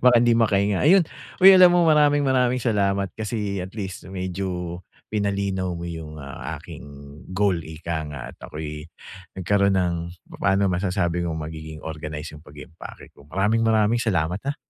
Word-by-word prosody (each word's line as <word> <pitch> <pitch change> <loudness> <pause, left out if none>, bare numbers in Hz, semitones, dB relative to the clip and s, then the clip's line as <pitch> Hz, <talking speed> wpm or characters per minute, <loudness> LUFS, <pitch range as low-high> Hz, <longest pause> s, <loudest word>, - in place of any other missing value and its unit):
Baka 125 -1 +7
hindi 120 0 +4
makahinga. 100 -3 +2
Ayun, 185 +5 +6 0.4
uy 190 +1 +10
alam 185 -1 +8
mo 175 -1 +4
maraming 145 -2 +4
maraming 125 -1 +2
salamat 100 -4 +1
kasi 105 -3 -3
at 95 - -8
least 95 -3 -6
medyo 90 -2 -4 0.3
pinalinaw 100 -2 -1
mo 85 - -6
yung, 80 -2 -7
ah, 70 +1 -7
aking 80 +1 -11 0.5
goal 100 +1 +2
ika 80 0 -5
nga 75 -2 -7
at - - -33
ako'y 75 0 -6 0.6
nagkaroon 100 +1 +2
ng 90 -2 +1 0.3
papano 100 0 +1
masasabi 90 -1 0
kong 80 -2 -3
magiging 80 0 -7
organize 75 0 -6
yung 75 - -13
pag-i-impake 75 +1 -12
ko. - - -17
Maraming, 105 +4 +1
maraming 110 +1 +2
salamat 90 -4 0
ha? - - -3
95 Hz, 155 wpm, -23 LUFS, 80-110 Hz, 0.6 s, uy